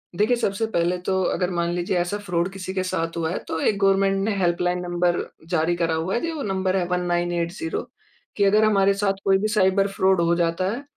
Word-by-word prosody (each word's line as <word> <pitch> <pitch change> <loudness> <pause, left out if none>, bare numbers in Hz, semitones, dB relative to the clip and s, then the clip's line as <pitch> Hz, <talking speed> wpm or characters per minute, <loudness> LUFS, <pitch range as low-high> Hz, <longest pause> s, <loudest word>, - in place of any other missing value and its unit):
देखिए 215 +6 +2
सबसे 205 0 -1
पहले 170 +1 +1
तो 190 0 +1
अगर 180 -1 -1
मान 170 -1 -1
लीजिए 175 +1 -1
ऐसा 175 +3 -1
फ़्रॉड 175 0 0
किसी 190 -1 -6
के 185 -1 -1
साथ 165 -2 -2
हुआ 160 -1 -1
है - - -2
तो 160 - -3
एक 205 - +1
गवर्नमेंट 195 0 +3
ने 215 -1 0
हेल्पलाइन 180 0 +1
नंबर 175 0 0 0.3
जारी 175 0 +1
करा 165 -1 0
हुआ 165 +4 -2
है, - - +1
जी 335 - -2
वो 310 -3 -5
नंबर 190 -2 -1
है 180 - 0
1980 175 - -1 0.5
कि 205 - +1
अगर 210 +2 +4
हमारे 200 -2 +4
साथ 200 0 0
कोई 195 -1 +4
भी 210 - -1
साइबर 195 -2 +2
फ़्रॉड 190 -2 +2
हो 170 0 +2
जाता 170 +2 0
है 245 +6 -5
185 Hz, 220 wpm, -23 LUFS, 175-195 Hz, 0.5 s, अगर